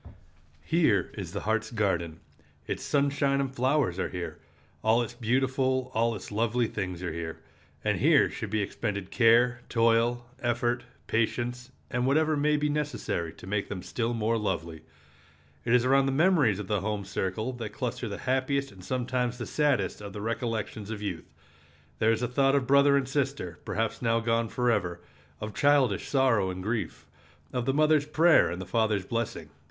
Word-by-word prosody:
Here 160 -11 +2
is 95 -5 -6
the 100 - -4
heart's 110 +1 0
garden. 90 -8 -1 0.4
Its - - -3
sunshine 140 -1 +1
and 135 -1 -2
flowers 130 - +1
are - - -1
here. 90 -1 -6 0.4
All 115 +2 +4
its 120 - -7
beautiful, 130 +2 0
all 115 +1 +1
its 100 - -8
lovely 115 +3 +1
things 90 -5 -4
are 90 - -3
here. 80 -1 -5 0.5
And - - +1
here - - +5
should 110 - -6
be 105 0 0
expended 100 -2 -4
care, 120 +1 +4
toil, 115 +1 +2 0.2
effort, 120 0 0 0.2
patience, 120 +2 -1 0.2
and 125 -1 0
whatever 155 +3 +3
may 150 +1 +2
be 150 0 0
necessary 145 - -2
to - - -13
make 100 +1 -2
them 95 -3 -5
still 120 0 -2
more 115 +1 0
lovely. 85 -6 -3 0.8
It 115 - +2
is 125 0 +3
around 135 +1 +4
the - - +1
memories 150 - +3
of 105 - -5
the 105 0 -1
home 105 -1 -2
circle 100 +5 -2
that 115 -3 -5
cluster 120 +1 -4
the 100 - -5
happiest 135 +1 0
and 95 -2 -14
sometimes 125 +1 -1
the 120 - -4
saddest 140 -11 0
of 100 -1 -8
the 105 - -6
recollections 110 -2 -3
of 110 -2 -5
youth. 90 -5 -5 0.7
There 110 +1 +4
is 115 0 0
the 125 - 0
thought 135 +2 +2
of 140 -2 +1
brother 140 +2 +5
and 135 -2 0
sister, 135 - -2
perhaps 115 0 -2
now 115 -1 +2
gone 115 0 0
forever; 105 -9 0 0.4
of 105 0 -5
childish 140 -8 +3
sorrow 125 -8 +3
and 90 0 -5
grief; 110 +2 -3 0.5
of 125 0 -2
the 135 - +2
mother's 155 -1 +3
prayer 155 - +5
and 90 +1 -4
the 95 - -5
father's 110 -4 0
blessing. 110 -9 -3
115 Hz, 175 wpm, -28 LUFS, 105-130 Hz, 0.8 s, here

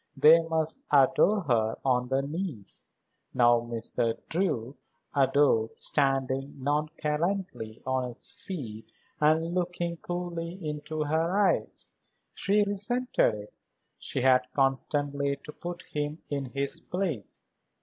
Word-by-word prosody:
They 160 +2 +8
must 160 -1 -1
adore 150 +9 +5
her 115 -8 +1
on 125 -2 +2
their 135 +1 +1
knees. 150 - -5 0.5
Now 120 -1 +5
Mr. 115 0 -2
Drew 150 -8 -1 0.4
adored 135 -5 +3
standing 135 -1 0
nonchalantly 150 - -2
on 130 -1 0
his 120 - -7
feet 115 - -7 0.3
and 160 +3 +3
looking 175 -1 -1
coolly 175 -1 -4
into 155 -1 -3
her 160 +5 +1
eyes. 205 -2 +1 0.4
She 205 +1 +2
resented 205 - +1
it; 105 0 -10 0.5
she 130 - -3
had 130 0 +4
constantly 140 +1 +1
to 150 - -8
put 175 +3 -7
him 150 +1 -4
in 140 -1 -1
his 140 +5 -2
place. 170 - -3
150 Hz, 115 wpm, -28 LUFS, 130-170 Hz, 0.5 s, They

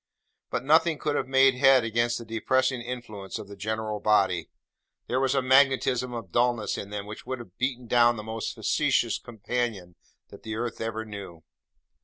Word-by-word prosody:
But - - -2
nothing 160 +2 +4
could 145 0 -2
have - - -1
made 135 0 +5
head 130 -1 +5
against 120 +1 0
the 115 - -8
depressing 130 +3 0
influence 120 -5 -6
of 100 - -8
the 100 - -10
general 110 +1 -3
body. 95 -6 +2 0.6
There 125 - 0
was 135 0 +1
a 135 - +2
magnetism 130 -1 +3
of 115 -7 -7
dulness 120 -2 +1
in 100 - -6
them 105 -1 -5
which 105 +3 -9
would 130 0 -3
have 115 -7 -12
beaten 125 -1 -1
down 120 0 +4
the 105 - -6
most 110 0 -4
facetious - - +1
companion 115 -5 -4 0.4
that - - -13
the 110 -1 -5
earth 120 0 -4
ever 110 0 -3
knew. 95 -6 -9
120 Hz, 180 wpm, -27 LUFS, 105-130 Hz, 0.6 s, made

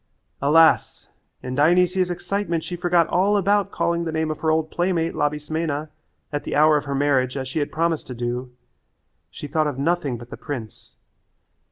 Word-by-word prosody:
Alas! 160 +3 +3 0.3
In 125 - -4
Dionysia's 180 +5 +3
excitement 175 -1 -2
she 180 - -5
forgot 175 -1 +2
all 200 +3 +2
about 200 +1 +2
calling 170 -3 -1
the 165 - -3
name 160 0 -1
of 155 - -5
her 160 - 0
old 155 0 +1
playmate, 175 -2 0
Labismena, 150 0 -2 0.4
at 145 - -2
the - - -3
hour 155 +1 +5
of 145 - 0
her 140 -1 -3
marriage 135 -2 +1
as 130 -1 -4
she 135 +5 -3
had 145 - -2
promised 165 0 -1
to 125 - -7
do. 120 +1 -4 0.8
She 90 - -9
thought 155 +1 0
of 145 -3 -3
nothing 145 -3 0
but 120 +1 -12
the - - -7
prince. 120 - -8
155 Hz, 180 wpm, -23 LUFS, 140-170 Hz, 0.8 s, hour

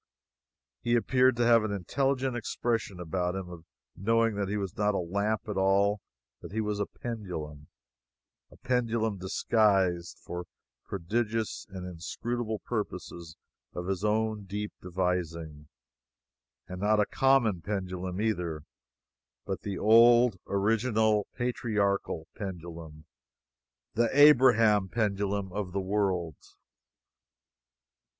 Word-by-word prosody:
He 120 0 +1
appeared 125 +1 +3
to 120 0 +1
have 115 -1 +5
an 110 - -2
intelligent 130 +7 -1
expression 115 -5 -2
about 90 +1 -2
him 95 -2 -5
of 85 -2 -11 0.3
knowing 115 +2 +2
that 100 -1 -2
he 105 - -1
was 95 -3 -4
not 105 -1 +1
a - - +1
lamp 100 +6 -1
at 105 -2 -3
all; 100 +2 +2 0.4
that - - -9
he 110 - -2
was 105 -1 -1
a 100 - -1
Pendulum; 80 -11 -6 0.8
a - - -18
pendulum 115 -4 0
disguised, 95 -2 +1
for 90 0 -5 0.4
prodigious 110 +4 -2
and 95 -2 -7
inscrutable 110 +6 -4
purposes 90 -7 -5 0.4
of 90 - -4
his 95 0 -2
own 110 -1 0
deep 105 +2 -4
devising, 85 -4 -3 1.0
and 90 +1 -7
not 105 +1 +3
a 105 - +4
common 120 -10 +2
pendulum 95 -1 -4
either, 90 -8 -1 0.8
but - - -4
the 100 -3 -4
old 115 -1 +6
original 110 +1 +2
patriarchal 105 -8 -1
Pendulum 85 -5 -8 0.9
the 115 0 +2
Abraham 115 -9 +6
Pendulum 100 -3 -1
of 100 -3 -4
the 100 - 0
world. 95 -5 -1
100 Hz, 115 wpm, -29 LUFS, 90-115 Hz, 1.0 s, old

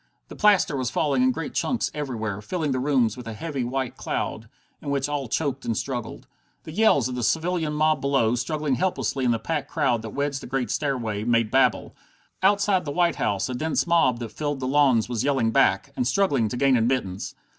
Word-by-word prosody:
The - - -9
plaster 205 -8 +3
was 130 -2 -1
falling 135 0 +1
in 130 0 +4
great 160 +3 -5
chunks 245 - -1
everywhere, 110 -8 -4
filling 155 - -2
the 130 - 0
rooms 125 -5 +1
with 125 -2 -9
a 115 - -5
heavy 140 +1 -3
white 130 +1 -3
cloud, - - -4 0.3
in - - -6
which 140 -1 0
all 145 -3 -3
choked 135 +2 -2
and 115 - -2
struggled. 120 -4 -5 0.4
The - - -9
yells 165 - +3
of 130 - -5
the 125 - -3
civilian 160 +4 0
mob 155 +1 +2
below, 135 -5 +2
struggling 150 +3 -1
helplessly 140 -4 -1
in - - +3
the 115 - +2
packed 150 +2 -3
crowd 120 -3 +1
that 110 - -6
wedged 140 -1 -1
the - - -8
great 130 0 -2
stairway, 115 -8 -2
made 115 -1 +1
babel. 135 0 +2 0.5
Outside 200 -1 +3
the 145 - -5
White 175 +2 +1
House 100 -2 0
a 130 - -4
dense 155 +6 0
mob 165 -8 +3
that 120 -1 -6
filled 145 +1 -3
the 130 - -3
lawns 130 -5 +3
was 120 -3 -2
yelling 135 -5 +1
back, 95 -3 +2
and 125 - 0
struggling 135 - +2
to 125 - -4
gain 135 0 +4
admittance. 115 -5 -1
135 Hz, 210 wpm, -24 LUFS, 120-150 Hz, 0.5 s, in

